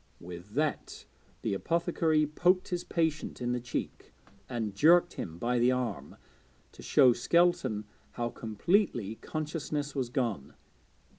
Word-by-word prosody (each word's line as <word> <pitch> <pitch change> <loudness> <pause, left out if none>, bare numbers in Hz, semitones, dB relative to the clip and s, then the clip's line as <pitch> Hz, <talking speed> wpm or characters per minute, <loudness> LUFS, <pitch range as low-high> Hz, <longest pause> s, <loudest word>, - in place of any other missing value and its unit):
With 90 +4 -10
that 150 +1 -2 0.4
the - - 0
apothecary 165 - +1
poked 180 +5 +2
his 175 -1 -2
patient 160 -3 -1
in 120 -1 -1
the 125 - 0
cheek, 120 0 -5 0.4
and 110 -4 -3
jerked 175 - +5
him 85 -1 -6
by 120 +6 0
the 120 +2 +4
arm, 125 -2 -3 0.6
to - - -14
show 125 -2 +5
Skelton 135 -5 +2 0.3
how 120 -1 -2
completely 115 - 0
consciousness 150 -2 -3
was 130 -4 -2
gone. 115 - -2
130 Hz, 130 wpm, -30 LUFS, 115-165 Hz, 0.6 s, jerked